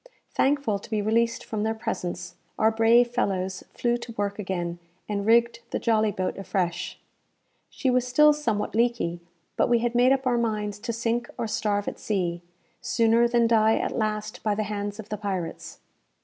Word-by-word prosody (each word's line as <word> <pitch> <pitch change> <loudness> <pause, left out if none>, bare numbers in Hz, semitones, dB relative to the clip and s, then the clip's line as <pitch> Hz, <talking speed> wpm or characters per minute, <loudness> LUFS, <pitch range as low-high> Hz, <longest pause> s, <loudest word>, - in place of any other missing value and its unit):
Thankful 270 -7 +1
to 205 - -13
be 215 -1 0
released 230 +3 +1
from 215 -2 -3
their 220 +1 0
presence, 180 -6 -4 0.2
our 220 +1 +4
brave 230 +2 +4
fellows 190 -5 -1
flew 240 0 0
to 235 -1 -9
work 205 -1 -2
again, 175 -3 -3 0.3
and 205 -1 -2
rigged 235 +1 +4
the - - -1
jolly 220 -2 +2
boat 185 0 -3
afresh. 180 -3 -2 0.7
She 260 - 0
was 250 0 +1
still 300 +4 +6
somewhat 230 -9 -2
leaky; 230 -7 +1 0.4
but - - +2
we 240 - +5
had 240 +1 -1
made 245 +2 +4
up 270 0 +1
our 245 -2 +2
minds 210 -3 -2
to 235 +3 -3
sink 235 +1 -1
or 235 - -2
starve 205 -2 -1
at - - -4
sea, 175 -5 -1 0.4
sooner 230 +1 +3
than 235 0 +3
die 225 -1 +4
at - - -2
last 215 -1 -2
by 210 -2 0
the 215 - -1
hands 205 0 -4
of 215 -1 -8
the 210 - -3
pirates. 190 -5 -4
220 Hz, 180 wpm, -26 LUFS, 205-235 Hz, 0.7 s, still